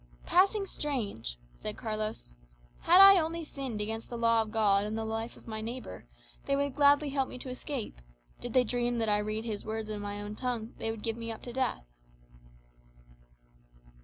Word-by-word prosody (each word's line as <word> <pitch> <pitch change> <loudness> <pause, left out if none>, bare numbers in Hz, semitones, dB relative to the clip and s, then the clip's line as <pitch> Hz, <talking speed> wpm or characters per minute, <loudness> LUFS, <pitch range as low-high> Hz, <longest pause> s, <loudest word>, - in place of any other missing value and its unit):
"Passing 395 +3 +3
strange," 220 - -3 0.2
said 210 -1 -5
Carlos. 215 - -4 0.5
"Had 355 +2 +6
I 390 -1 +10
only 330 +1 -2
sinned 265 -7 -5
against 225 +2 -4
the 240 - -5
law 230 -1 +4
of 220 - -4
God 205 -3 +3
and 210 +1 -3
the 225 - -2
life 225 +1 -4
of - - -17
my 220 -1 -5
neighbour, 225 - -7 0.4
they 275 - +2
would 280 -1 0
gladly 285 +1 +4
help 270 -1 0
me - - -7
to 255 - -6
escape; 255 - -5 0.4
did 245 -1 -6
they 255 - +5
dream 240 +1 0
that 225 -2 0
I 210 0 +4
read 215 +2 -3
his 215 -3 -3
words 220 0 -4
in 210 -1 -4
my 205 0 -4
own 205 +1 -6
tongue, 240 -2 -3
they 225 - -2
would 225 -1 -5
give 225 -1 -1
me 230 -1 -4
up 220 - -8
to 240 - -7
death." 255 - -1
230 Hz, 190 wpm, -30 LUFS, 215-265 Hz, 0.5 s, I